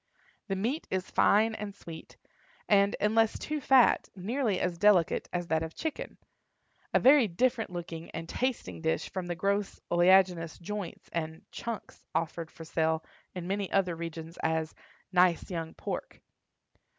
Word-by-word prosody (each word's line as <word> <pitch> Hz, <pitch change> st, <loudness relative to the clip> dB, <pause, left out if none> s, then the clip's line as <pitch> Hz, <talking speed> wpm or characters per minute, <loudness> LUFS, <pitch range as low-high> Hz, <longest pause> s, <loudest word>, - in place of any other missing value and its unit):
The 195 Hz, -, -1 dB
meat 235 Hz, +11 st, -2 dB
is 185 Hz, -1 st, -2 dB
fine 220 Hz, +2 st, +4 dB
and 210 Hz, -2 st, -6 dB
sweet, 165 Hz, -5 st, -11 dB, 0.5 s
and, 200 Hz, 0 st, +4 dB
unless 220 Hz, +1 st, +3 dB
too 305 Hz, -1 st, -3 dB
fat, 260 Hz, -2 st, +5 dB
nearly 215 Hz, +1 st, -1 dB
as 175 Hz, -2 st, -1 dB
delicate 200 Hz, -5 st, +4 dB
as 175 Hz, -1 st, -2 dB
that 160 Hz, -1 st, +1 dB
of 160 Hz, 0 st, -5 dB
chicken—a 320 Hz, -1 st, -5 dB
very 265 Hz, -2 st, +6 dB
different 235 Hz, +5 st, 0 dB
looking 170 Hz, -2 st, -6 dB
and 165 Hz, 0 st, -6 dB
tasting 190 Hz, -, -2 dB
dish 80 Hz, +1 st, -1 dB
from 185 Hz, -2 st, -4 dB
the 175 Hz, -, -2 dB
gross 200 Hz, +3 st, -1 dB
oleaginous 175 Hz, -1 st, +4 dB
joints 200 Hz, +1 st, -6 dB
and 160 Hz, -1 st, -3 dB
"chunks" 230 Hz, -3 st, -6 dB
offered 165 Hz, 0 st, -2 dB
for 165 Hz, -, -11 dB
sale 160 Hz, 0 st, 0 dB, 0.3 s
in 180 Hz, -1 st, -5 dB
many 195 Hz, 0 st, -2 dB
other 185 Hz, -3 st, +2 dB
regions 165 Hz, 0 st, -7 dB
as 160 Hz, -1 st, 0 dB, 0.4 s
"nice 180 Hz, -1 st, +3 dB
young 165 Hz, -2 st, -4 dB
pork." -, -, -5 dB
180 Hz, 145 wpm, -30 LUFS, 165-210 Hz, 0.5 s, very